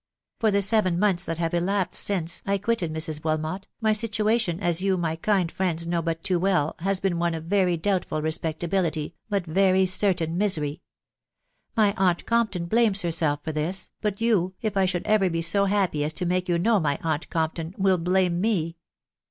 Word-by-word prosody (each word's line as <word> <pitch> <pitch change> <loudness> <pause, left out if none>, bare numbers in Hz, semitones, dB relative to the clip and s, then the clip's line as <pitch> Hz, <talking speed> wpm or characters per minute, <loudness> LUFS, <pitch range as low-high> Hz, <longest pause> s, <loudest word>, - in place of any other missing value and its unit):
For 225 - +2
the 200 -1 +2
seven, 195 -4 +3
months 190 -2 +1
that 165 - -3
have 165 0 -2
elapsed 185 +2 0
since' 175 -4 -1
I 200 0 +2
quitted 195 -5 -1
Mrs.Wilmot, 155 +3 -3
my 220 -1 +3
situ 215 0 0
ation, 215 -7 +1
as 175 -3 0
you, 190 -1 +1
my 165 -2 -1
kind 180 0 0
friends, 170 -3 -2
know 170 0 -1
but 165 0 -3
too 180 -2 +1
well, 180 -5 +1
has 195 +2 -1
been 185 -3 -1
one 170 -1 0
of 160 - -6
very 180 0 +1
doubtful 180 -2 -1
respectability, 160 0 -2 0.2
but 200 -4 -1
very 190 +2 +3
certain 180 -3 +2
misery. 155 -8 +1 1.0
My 210 -2 +4
aunt 180 -2 +1
Compton 220 -7 0
blames 210 0 +2
herself 160 -4 0
for 160 - -3
this; 155 +5 0
but 205 -2 -2
you, 195 -6 +1
if 215 -3 -3
I 190 -1 +3
should 180 -1 -2
ever 210 -3 +3
be 165 -1 -2
so 200 +4 +3
happy 190 -7 0
aa 150 - -1
to 155 +3 -1
make 180 +1 -1
you 175 - +2
know 215 +5 +2
my 145 -4 0
aunt 160 -1 -2
Compton, 165 +1 -3
will 190 -2 +2
blame 180 0 +1
me. 175 -6 -1
180 Hz, 190 wpm, -25 LUFS, 165-195 Hz, 1.0 s, My